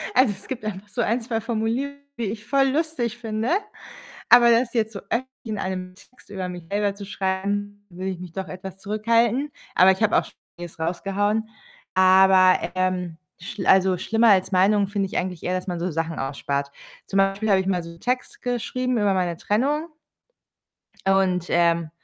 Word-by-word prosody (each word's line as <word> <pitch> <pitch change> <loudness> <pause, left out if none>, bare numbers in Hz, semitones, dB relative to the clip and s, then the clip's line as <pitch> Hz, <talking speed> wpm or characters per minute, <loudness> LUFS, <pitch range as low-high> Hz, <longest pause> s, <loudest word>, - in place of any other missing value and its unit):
also 255 -4 +5
es 195 - -15
gibt 250 -4 -5
einfach 205 -1 -5
so 240 +4 -3
1, 230 +2 +1
2 225 -1 -2
Formulierungen, 235 +5 -2 0.2
die 235 - -1
ich 210 +1 -5
voll 275 -1 +3
lustig 265 -6 -1
finde, 225 -1 -3 0.8
aber 240 0 +8
das 235 +1 +3
jetzt 220 -1 0
so 200 - -5
öffentlich 250 +3 0 0.2
in 215 -3 -4
einem 185 -1 -4
Text 230 +4 -20
über 190 -2 -4
mich 175 -2 -8
selber 205 0 0
zu 200 0 -9
schreiben, 205 +1 -3
würde 185 +2 -5
ich 185 - -5
mich 180 -2 -9
doch 190 +1 -5
etwas 190 +1 -8
zurückhalten. 230 +6 +1 0.2
Aber 185 +1 +7
ich 190 - -4
habe 215 - +3
auch - - +1
schon - - -15 0.2
vieles 175 -2 -9
rausgehauen. 200 +6 -1 0.5
Aber, 185 0 +6 0.2
ähm, 185 -2 -1 0.2
schl 190 +3 -6
also 190 -1 +4
schlimmer 225 +4 +2
als 190 -1 +3
Meinungen 200 +2 +3
finde 200 -1 -1
ich - - -2
eigentlich 180 -2 -4
eher, 180 - -1
dass 185 - -3
man 175 -1 -2
so 180 +2 -1
Sachen 165 0 -3
ausspart. 140 +1 -3 0.4
Zum 195 - -1
Beispiel 195 +2 +1
habe 195 -1 +5
ich 190 - -4
mal 185 -2 0
so 170 - -9
'n 170 0 -14
Text 250 +1 -2
geschrieben 250 +1 -1
über 205 -2 +2
meine 180 -2 0
Trennung 285 - 0 1.2
und, 190 -2 +2
ähm, 170 -1 +2
200 Hz, 190 wpm, -23 LUFS, 185-225 Hz, 1.2 s, aber